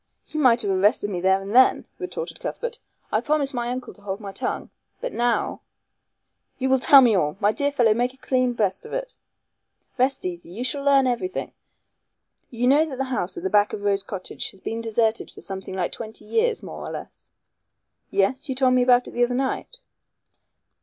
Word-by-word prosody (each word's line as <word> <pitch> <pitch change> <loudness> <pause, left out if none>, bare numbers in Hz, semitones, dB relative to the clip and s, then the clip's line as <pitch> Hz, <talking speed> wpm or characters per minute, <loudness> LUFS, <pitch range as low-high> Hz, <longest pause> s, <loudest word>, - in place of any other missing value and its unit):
"You 310 - -5
might 245 -4 +4
have 200 - 0
arrested 205 +2 +2
me 180 -2 -3
then 190 +1 +3
and 200 +4 -5
there," 260 +1 +6 0.2
retorted 380 +6 -5
Cuthbert. 480 0 -5 0.3
"I - - +2
promised 295 -3 0
my 240 -1 -2
uncle 250 -1 -5
to 205 - -21
hold 200 0 -4
my 200 -2 -7
tongue. 195 - -4 0.3
But - - -4
now 240 0 0 0.5
" - - -52
"You 265 0 -1
will 265 0 +4
tell 280 +1 +8
me 240 -4 +5
all. 150 -2 0
My 205 0 +3
dear 285 +5 -1
fellow, 240 -6 +4
make 245 +3 0
a 265 - -21
clean 255 -2 +1
breast 200 -5 -1
of - - -10
it." - - -3 0.9
"Rest 265 -2 +1
easy, 175 -2 -5
you 210 +8 -5
shall 280 +2 -2
learn 275 -1 +5
everything. 255 +10 -2 1.0
You 240 0 -2
know 280 +5 +5
that 265 - -6
the 270 - 0
house 180 -7 -2
at - - -6
the 190 - -1
back 205 0 +3
of 205 - -5
Rose 200 -1 +1
Cottage 195 -1 -5
has 195 - -12
been 225 +4 -4
deserted 225 0 0
for - - -13
something 190 -1 -6
like 180 -2 -1
twenty 220 -2 -8
years 450 - +1
more - - -7
or - - -5
less." - - -9 0.8
"Yes. 200 +9 0
You 265 - -1
told 260 -1 +3
me 255 - +4
about 245 0 +4
it - - -8
the 245 - +1
other 245 +1 +1
night." 270 - -3
245 Hz, 205 wpm, -24 LUFS, 205-270 Hz, 1.0 s, tell